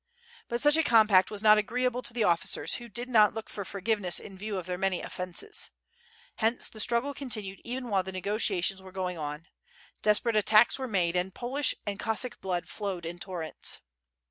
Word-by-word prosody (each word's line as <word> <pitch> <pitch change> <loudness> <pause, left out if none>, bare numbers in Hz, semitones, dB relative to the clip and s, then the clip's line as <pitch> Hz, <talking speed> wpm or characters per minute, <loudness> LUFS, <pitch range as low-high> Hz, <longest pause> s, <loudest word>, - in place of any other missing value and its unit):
But 235 0 -1
such 295 +1 +5
a 320 - +3
compact 215 -7 +5
was 210 -1 -6
not 215 0 +7
agreeable 250 +3 -1
to 240 - -3
the 235 -1 0
officers, 170 -4 +2
who 235 - -10
did 240 +4 -3
not 215 -4 +4
look 225 - -6
for 200 - -4
forgiveness 200 -2 -1
in 195 - -11
view 205 +1 -4
of 180 - -5
their 180 0 -3
many 195 -2 +1
offences. 180 - -3 0.7
Hence 225 +2 +1
the 215 - -11
struggle 235 +5 +2
continued 215 -9 -3
even 250 +1 -4
while 200 -4 +2
the 190 +1 -7
negotiations 190 -1 0
were 190 0 -12
going 180 -2 -4
on; 150 +2 -5 0.6
desperate 215 +2 +2
attacks 215 +4 +5
were 260 - -3
made, 180 -6 0
and 180 +1 -1
Polish 265 +4 0
and 200 -1 -4
Cos 225 -1 -1
sack 250 - -6
blood 180 -2 -2
flowed 195 -5 -4
in 175 +1 -6
torrents. 175 -4 -2
210 Hz, 195 wpm, -29 LUFS, 185-235 Hz, 0.7 s, not